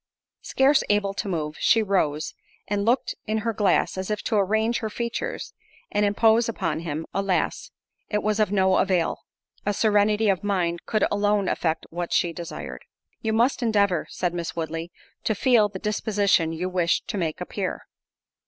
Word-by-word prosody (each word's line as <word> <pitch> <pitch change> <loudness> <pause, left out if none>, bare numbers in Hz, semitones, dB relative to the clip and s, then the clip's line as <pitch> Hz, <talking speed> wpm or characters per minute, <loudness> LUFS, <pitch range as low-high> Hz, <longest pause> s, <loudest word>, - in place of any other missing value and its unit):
Scarce 270 +2 +3
able 205 -1 +2
to 200 - -4
move, 155 -5 -3
she 225 - +4
rose, 155 -7 0 0.3
and 200 0 -1
looked 245 +3 +1
in 215 +1 0
her 230 - +1
glass, 195 -2 +1
as 190 - -4
if 210 -1 -2
to 225 - -1
arrange 220 +4 +2
her 220 - -3
features, 235 +2 -4 0.4
and 205 - +1
impose 220 +3 +3
upon 165 -8 -2
him: 160 -1 -4
alas! 195 -2 -1 0.4
it 210 -1 -1
was 215 0 0
of 210 -2 +2
no 190 -2 +3
avail—a 185 +2 -2
serenity 210 0 +3
of 195 -2 +1
mind 175 -4 -1
could 215 -2 +1
alone 205 -1 +1
effect 160 -1 -1
what 175 +1 -4
she 170 -1 +2
desired. 170 0 -7 0.4
"You 220 - -1
must 235 +5 +2
endeavour," 200 -7 +2
said 175 -1 -2
Miss 170 -1 -4
Woodley, 165 +1 -4 0.3
"to 220 - 0
feel 225 -1 +4
the 195 - -7
disposition 200 -4 +1
you 165 +3 -3
wish 180 -2 +1
to - - -5
make 165 -5 -2
appear." - - -4
200 Hz, 165 wpm, -25 LUFS, 175-215 Hz, 0.4 s, she